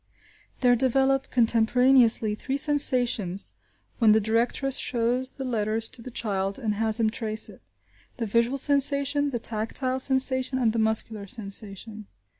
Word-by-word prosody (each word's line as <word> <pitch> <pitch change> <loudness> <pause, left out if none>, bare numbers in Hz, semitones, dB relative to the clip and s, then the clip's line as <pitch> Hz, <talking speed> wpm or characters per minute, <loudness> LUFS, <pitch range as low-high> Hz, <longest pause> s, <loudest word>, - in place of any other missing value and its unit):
There 245 -1 +4
develop, 270 +2 0
contemporaneously, 235 -1 +2
three 265 +6 -4
sensations 250 - +1 0.5
when 220 -3 +5
the 220 - +3
directress 235 +5 0
shows 250 +2 -1
the 270 - -7
letter 220 -3 -2
to 225 +2 -5
the 255 - -9
child 195 -4 -3
and 220 -5 -3
has 220 +1 -1
him 220 -1 +1
trace 220 -3 -1
it; 195 - -15 0.6
the 235 - -3
visual 235 +5 0
sensation, 280 +1 +2
the 250 - -3
tactile 235 +4 -2
sensation, 260 0 +3
and 235 -4 0
the 230 - -2
muscular 220 -1 -1
sensation. 210 0 -5
235 Hz, 140 wpm, -25 LUFS, 220-260 Hz, 0.6 s, when